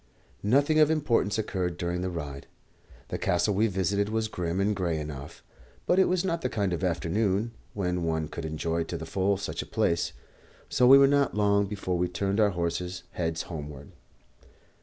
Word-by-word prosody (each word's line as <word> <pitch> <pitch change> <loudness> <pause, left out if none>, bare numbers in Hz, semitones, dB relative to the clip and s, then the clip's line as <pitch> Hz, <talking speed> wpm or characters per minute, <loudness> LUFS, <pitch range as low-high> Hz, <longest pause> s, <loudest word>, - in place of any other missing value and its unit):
Nothing 140 +8 +3
of 155 -1 +6
importance 125 -10 +1
occurred 90 -5 -2
during 90 0 -2
the 90 - -1
ride. 70 -5 -6 0.6
The - - -3
castle 90 +4 +1
we 105 +4 +3
visited 100 +1 0
was 110 0 -1
grim 90 -2 -2
and 105 +2 +1
grey 85 -4 -1
enough; 75 0 -7 0.4
but 180 - +3
it 190 - +6
was 185 0 +1
not 170 -2 -1
the 125 - -1
kind 100 -5 -1
of 85 - -3
afternoon 95 +5 0 0.2
when 90 -3 -1
one 80 -2 -1
could 85 - -7
enjoy 80 +2 -1
to 85 - -4
the 80 - -6
full 95 +3 +1
such 100 - -4
a - - -7
place, 85 0 0 0.6
so 125 - +4
we 135 +2 +10
were 140 - +7
not 140 -3 +2
long 100 -1 +3
before 95 -3 -2
we 90 - +2
turned 95 +4 -1
our 105 -1 +5
horses' 90 0 -3
heads 80 -2 -2
homeward. 75 -4 -8
95 Hz, 185 wpm, -28 LUFS, 85-110 Hz, 0.6 s, we